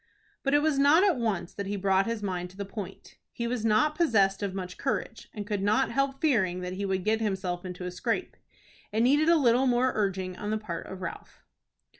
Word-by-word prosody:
But 275 +1 +1
it 290 - +4
was 305 -3 +2
not 295 +6 +6
at 385 -8 +3
once 215 -7 -2
that 200 -1 -5
he 205 - -2
brought 195 0 +2
his 230 -2 -3
mind 180 -2 -3
to 185 - -17
the 200 - -4
point. 195 -1 -8
He 235 - -4
was 235 -1 -2
not 225 +8 +3
possessed 220 - +2
of 195 -2 -3
much 185 -1 -5
courage, 270 -4 -3
and 205 -1 -6
could 205 -2 -2
not 215 +7 +2
help 275 0 0
fearing 190 - +1
that 180 0 -4
he 200 +2 -3
would 190 -1 -1
get 220 +1 +1
himself 190 -4 -2
into 180 -1 -6
a 180 - -3
scrape. 180 - -2 0.6
It 220 +2 +1
needed 290 +6 +4
a 340 - +6
little 255 -2 +3
more 250 +1 +3
urging 190 -3 -1
on 210 - -4
the 215 - 0
part 175 -6 -6
of 190 -1 -8
Ralph. 170 - -8
210 Hz, 225 wpm, -28 LUFS, 190-255 Hz, 0.6 s, not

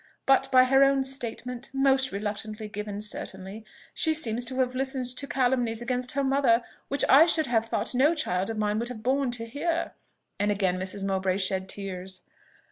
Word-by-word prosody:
But, 270 0 +3
by 255 -1 +7
her 270 +2 +5
own 275 0 +3
statement 250 -1 -4
most 270 -1 +3
reluctantly 210 +2 -4
given, 210 0 -6
certainly, 210 0 -6 0.3
she 315 -1 +2
seems 240 -6 +1
to 260 - -3
have 250 -1 +1
listened 265 0 -1
to 280 - -3
calumnies 245 -3 0
against 250 +1 -1
her 280 +1 0
mother, 265 -3 +3 0.2
which 280 +1 +1
I 300 +5 +7
should 320 -2 +2
have 225 -2 0
thought 225 +2 -1
no 285 +7 +3
child 190 - -1
of 225 - -4
mine 210 0 0
would 235 +1 -3
have 220 -3 -8
borne 265 +2 +1
to 240 -1 -2
hear;" 325 +8 -2 0.5
and 205 +1 +1
again 190 -3 0
Mrs. 190 +1 -3
Mowbray 190 -1 0
shed 190 -1 -1
tears. 190 -2 -6
240 Hz, 185 wpm, -27 LUFS, 205-270 Hz, 0.5 s, by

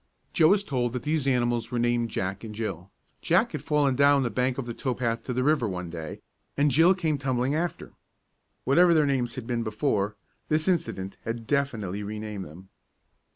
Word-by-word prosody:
Joe 160 - +5
was 200 +3 +4
told 125 - -1
that 125 - -4
these 150 -2 0
animals 120 -2 +1
were 125 - -3
named 120 0 +1
Jack 95 0 -3
and 110 -2 -7
Jill. 95 -5 -4 0.3
Jack - - +2
had - - -4
fallen 145 -3 +2
down 140 0 +5
the 120 - -1
bank 125 0 0
from 135 - -4
the 120 - -5
tow 125 +1 -2
path 115 -2 -1
to - - -3
the 125 +1 0
river 145 -4 +2
one 90 -2 -5
day, 80 -3 -7 0.4
and 145 0 +3
Jill 160 +6 +5
had - - -16
come 155 -5 0
tumbling 130 0 0
after. 170 +3 -3 0.7
Whatever 170 +6 +5
their 155 -2 +4
names 125 -4 0
had 130 - -6
been 120 -1 -1
before, 105 -2 -1 0.3
this 155 +2 +1
incident 100 - -1
had 115 0 -4
definitely 110 -9 -1
renamed 105 -1 -5
them. 90 +6 -13
125 Hz, 200 wpm, -27 LUFS, 110-140 Hz, 0.7 s, Joe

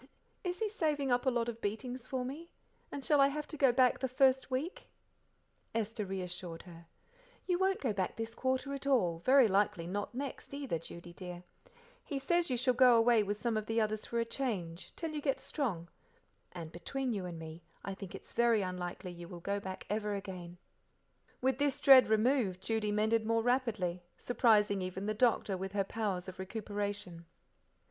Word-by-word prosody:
"Is 360 -1 -2
he 440 - 0
saving 300 - 0
up 245 +2 +2
a - - +7
lot 240 -2 0
of 230 -1 -5
beatings 245 +4 -4
for 255 -1 -2
me? 310 +7 -7 0.4
And 280 -2 -5
shall 295 -2 +5
I 275 - +7
have 300 +2 -4
to - - -6
go 270 -3 +5
back 250 0 +4
the 260 - 0
first 260 +1 +3
week?" 270 +8 -3 0.9
Esther 220 -1 -1
reassured 180 -3 -5
her. 170 -2 -13 0.6
"You 360 -1 +1
won't 380 0 +2
go 245 -6 0
back 190 -2 -1
this 225 0 -4
quarter 260 +2 -1
at 275 0 -5
all, 185 -12 +2
very 260 +5 +6
likely 195 -4 +1
not 205 +6 -4
next 275 +1 -5
either, 275 - -2
Judy 170 +1 -10
dear. 180 -1 -8 0.6
He 285 - -4
says 345 +5 +1
you 250 - 0
shall 255 +1 +2
go 250 0 +7
away 230 -1 +5
with 205 0 -2
some 230 +1 0
of 215 0 -3
the 225 +1 +1
others 215 -1 -1
for 235 - -1
a 230 - +1
change 195 -10 -3
till 325 -2 -4
you 300 -1 -3
get 275 -2 0
strong; 195 - -2 0.6
and, 165 -3 -7
between 260 +9 -3
you 190 -4 -3
and 170 -2 -6
me, 160 +1 -8 0.2
I 195 - -3
think 190 -1 -8
its - - -11
very 235 -3 +3
unlikely 180 0 -4
you, 175 -1 -9
will 175 -1 -8
go 200 +4 -2
back 190 -1 -7
ever 210 0 -1
again." 180 -3 -7 0.8
With 260 +1 +1
this 285 -2 +1
dread 265 -2 +8
removed, 220 -3 +2
Judy 220 0 0
mended 220 +2 +2
more 225 +1 +1
rapidly, 225 -8 0 0.2
surprising 210 -5 +3
even 185 +1 -4
the 215 - 0
doctor 215 -3 +2
with 190 +1 -5
her 200 -1 +2
powers 195 -3 -2
of 185 0 -8
recuperation. 205 -3 -4
220 Hz, 190 wpm, -33 LUFS, 190-260 Hz, 0.9 s, dread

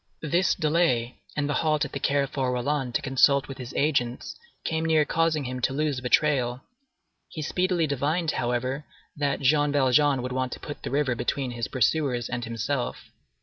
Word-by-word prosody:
This 170 +5 +2
delay 150 -7 +1 0.2
and 145 -1 0
the 145 - 0
halt 155 -1 +1
at - - -8
the 140 - -4
Carrefour 140 -2 0
Rollin 125 +1 -1
to - - 0
consult 135 +1 +3
with 135 - -8
his 125 -1 -7
agents 130 -5 0 0.3
came 160 0 -1
near 160 -2 +3
causing 160 -1 +1
him 125 0 -4
to 130 - +1
lose 145 -2 -1
the 125 - -3
trail. 130 -5 +2 0.7
He 155 - -6
speedily 180 +1 +1
divined, 155 +4 0
however, 125 +4 -1 0.3
that 145 -1 -1
Jean 145 +2 +3
Valjean 140 -1 +3
would 125 - -4
want 130 0 -2
to - - -8
put 145 - -8
the - - -4
river 140 -2 +1
between 130 +2 -2
his 120 -1 -3
pursuers 130 -2 0
and 125 -1 -3
himself. 115 - -3
140 Hz, 180 wpm, -26 LUFS, 125-150 Hz, 0.7 s, consult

